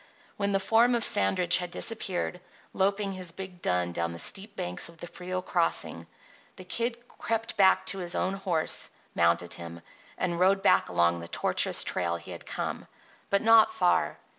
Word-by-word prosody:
When 200 -1 -1
the 195 - +2
form 225 +5 +3
of 235 - -1
Sandridge 185 -5 +2
had 180 -1 -4
disappeared, 180 -3 -2 0.3
loping 195 +1 0
his 185 -3 -5
big 180 0 -9
dun 90 -1 0
down 85 -1 -2
the 85 - -7
steep 200 - -1
banks 90 - -3
of 170 - -16
the 175 - -7
Frio 185 +1 -5
crossing, 170 -2 +2 0.5
the 185 - -10
Kid 235 +6 -1
crept 225 0 -3
back 190 -2 +4
to 195 - -2
his 175 -1 -4
own 190 - 0
horse, 185 -5 -1 0.2
mounted 85 +1 +1
him, 85 0 -9 0.4
and 170 -1 -2
rode 195 +1 +3
back - - +4
along 85 0 +2
the 85 - -8
tortuous - - +2
trail 85 -1 -1
he 85 - -9
had - - -9
come. - - -4 0.4
But 200 +1 +1
not 225 -1 +6
far. 75 - +1
180 Hz, 175 wpm, -28 LUFS, -, 0.5 s, not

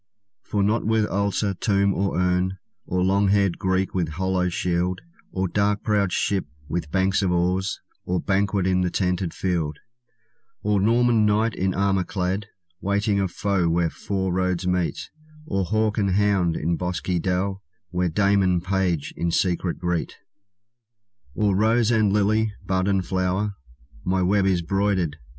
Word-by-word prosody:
For 100 -2 -1
not 110 +3 +1
with 110 0 +2
altar, 100 0 0
tomb, 100 +1 +1
or 95 -1 -1
urn, 90 +1 +1 0.3
Or 90 0 0
long 100 +2 +3
haired 100 -3 +2
Greek 95 0 0
with 90 -4 0
hollow 90 +2 0
shield, 90 0 -1 0.3
Or 95 0 -1
dark 100 +2 0
prowed 100 -3 +1
ship 95 -2 0 0.2
with 85 -2 -3
banks 95 +3 +1
of 95 -2 +1
oars, 90 +2 0 0.2
Or 90 0 -1
banquet 100 0 0
in 90 -1 +2
the 90 - +1
tented 90 -1 -1
field; 85 -6 -2 0.9
Or 105 -1 +2
Norman 115 +1 +3
knight 110 +2 +2
in 95 -1 -1
armor 95 -1 +1
clad, 95 +1 -2 0.3
Waiting 100 +1 0
a 95 - +1
foe 95 -1 0
where 85 0 +1
four 95 -2 -2
roads 90 -1 0
meet; 90 -2 -1 0.3
Or 95 -9 -1
hawk 110 +2 0
and 100 -2 +1
hound 100 -5 +2
in 85 +2 -1
bosky 90 0 -2
dell, 95 +2 -1 0.3
Where 90 0 0
dame 100 +3 +2
and 90 -2 +1
page 90 -5 -1
in 85 - -1
secret 90 0 0
greet; 90 -1 -2 1.2
Or 105 -3 +2
rose 110 +3 +3
and 110 -3 +3
lily, 105 +1 +1
bud 95 0 0
and 95 -2 +1
flower, 95 +3 -1 0.5
My 95 0 +1
web 95 +1 +2
is 90 -3 +1
broidered. 95 -4 0
95 Hz, 155 wpm, -24 LUFS, 90-100 Hz, 1.2 s, long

